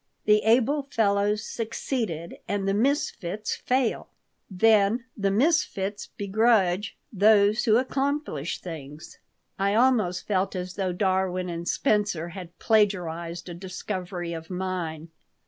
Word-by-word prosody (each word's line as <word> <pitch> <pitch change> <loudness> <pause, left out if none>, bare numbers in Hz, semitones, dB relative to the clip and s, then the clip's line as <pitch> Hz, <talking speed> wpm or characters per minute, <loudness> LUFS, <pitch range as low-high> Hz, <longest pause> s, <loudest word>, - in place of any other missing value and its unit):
"The 210 0 +5
able 255 +6 +3
fellows 210 -5 +1
succeed, 225 - -4
and 200 -1 -1
the 195 - +2
misfits 215 - -1
fail. 255 -2 0 0.4
Then 215 +4 +3
the 200 -2 0
misfits 205 - +1
begrudge 205 -1 +2 0.2
those 210 +2 +4
who 220 -2 +5
accomplish 265 - -2
things." 155 -3 -9 0.4
I 200 +1 +1
almost 220 -7 +2
felt 195 -1 0
as 180 0 -4
though 190 -2 -1
Darwin 185 -1 0
and 170 0 -5
Spencer 205 -7 0
had 175 -1 -10
plagiarized 175 -6 0
a 175 - -6
discovery 180 -1 -5
of 160 -1 -7
mine. 180 -4 -4
200 Hz, 115 wpm, -26 LUFS, 180-220 Hz, 0.4 s, The